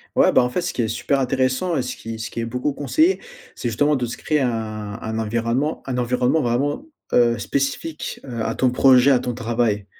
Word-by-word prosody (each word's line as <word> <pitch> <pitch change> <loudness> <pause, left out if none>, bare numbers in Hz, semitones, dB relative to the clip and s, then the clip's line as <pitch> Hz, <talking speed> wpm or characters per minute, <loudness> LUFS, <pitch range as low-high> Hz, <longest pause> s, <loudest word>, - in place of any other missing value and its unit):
Ouais, - - +5
bah, - - +5
en 125 - 0
fait, 180 - -1
ce 175 - -3
qui 120 - -1
est 110 - 0
super 135 +5 0
intéressant 130 +6 0
et - - +1
ce 125 +1 -4
qui 115 0 -7
ce 110 - -5
qui - - -5
est 115 - -1
beaucoup 125 +5 -2
conseillé, 315 - +2 0.4
c'est 120 - -3
justement 145 +7 +2
de 125 -3 -1
se 120 +1 -6
créer 150 -2 0
un 110 -4 -3
un 110 0 -3
environnement 115 +7 -1
un 130 -2 -3
environnement 125 +5 +1
vraiment, 140 - -1 0.3
heu, 120 -1 +4
spécifique, 140 +3 -3
heu, 120 -4 -5
à 115 - -2
ton 130 -1 +2
projet, 130 +1 +6
à 125 - +4
ton 125 - -3
travail. 115 -3 -1
125 Hz, 220 wpm, -22 LUFS, 115-140 Hz, 0.4 s, projet